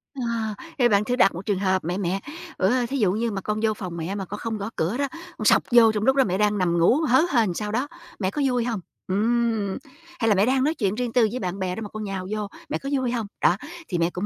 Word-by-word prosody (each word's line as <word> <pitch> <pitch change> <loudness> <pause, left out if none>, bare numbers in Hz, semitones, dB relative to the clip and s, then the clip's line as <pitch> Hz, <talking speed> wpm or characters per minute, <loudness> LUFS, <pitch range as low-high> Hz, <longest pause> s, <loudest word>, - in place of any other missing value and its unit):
À, 230 -4 -2 0.2
thì 245 - +6
bạn 205 -1 +3
thử 245 - 0
đặt 195 -8 +4
một 180 +3 -7
trường 200 -3 0
hợp: 190 -1 +1
"Mẹ, 175 +2 -1
mẹ, 190 0 -1 0.4
ủa 190 - +3 0.2
thí 275 - -1
dụ 205 -7 +3
như 225 +3 -1
mà 195 -2 -3
con 210 +2 -2
vô 220 -1 +3
phòng 185 -5 -6
mẹ 170 +4 -3
mà 195 -2 -4
con 205 +3 -7
không 225 -1 -3
gõ 200 +1 -4
cửa 175 +9 -1
đó, 280 0 0 0.3
con 215 - -4
xộc - - +5
vô 235 -2 +7
trong 210 -1 -2
lúc 265 +3 +4
đó 270 - +5
mẹ 185 -6 -1
đang 210 0 +2
nằm 175 -3 +1
ngủ 170 +8 +5
hớ 260 +3 +6
hênh 225 -7 +3
sao 210 +3 -3
đó, 250 +6 0 0.3
mẹ 190 -2 0
có 295 - -2
vui 250 -2 +1
hông? 230 -4 -2 0.3
Ừm, 220 0 +1 0.4
hay 225 - +1
là 210 - +4
mẹ 195 +2 +4
đang 260 +1 +2
nói 305 +3 +2
chuyện 205 -9 -1
riêng 245 -1 -2
tư 240 -3 +4
với 250 - -3
bạn 185 -1 -3
bè 185 -1 -2
đó 225 - -6
mà 210 - -6
con 215 +1 -6
nhào 195 -2 -4
vô, 215 -1 -2 0.2
mẹ - - -1
có 275 - -6
vui 255 -2 -1
hông? 230 -4 -2
Đó, 180 - +4 0.3
thì 175 - -2
mẹ 170 0 +2
cũng 180 +3 -4
210 Hz, 285 wpm, -24 LUFS, 190-235 Hz, 0.4 s, vô